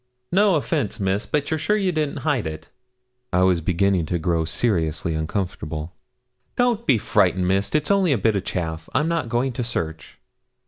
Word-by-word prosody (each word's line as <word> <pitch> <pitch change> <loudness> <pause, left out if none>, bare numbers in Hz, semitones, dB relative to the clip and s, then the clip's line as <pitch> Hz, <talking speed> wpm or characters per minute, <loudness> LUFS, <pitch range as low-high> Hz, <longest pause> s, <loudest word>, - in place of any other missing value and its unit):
'No 195 0 +4
offence, 115 -7 -1
Miss, 95 +2 0
but 150 0 -1
you're 160 - 0
sure 210 +8 +1
you 195 -3 +1
didn't 155 -3 -2
hide 140 - +1
it?' 80 0 -7 0.6
I 90 0 +3
was 90 -2 +3
beginning 90 0 +1
to 85 - 0
grow 85 -1 0
seriously 80 -5 0
uncomfortable. 80 -1 -3 0.6
'Don't 240 -2 +1
be 125 - +5
frightened, 95 -3 +2
Miss; 95 +2 +1
it's 150 +4 +1
only 195 -4 +3
a 135 - +3
bit 110 +1 +1
o' - - +2
chaff. 80 -3 -4
I'm 145 +4 +2
not 165 -7 -1
going 125 +3 0
to 120 +1 -3
search.' 80 -9 -4
100 Hz, 180 wpm, -23 LUFS, -, 0.6 s, be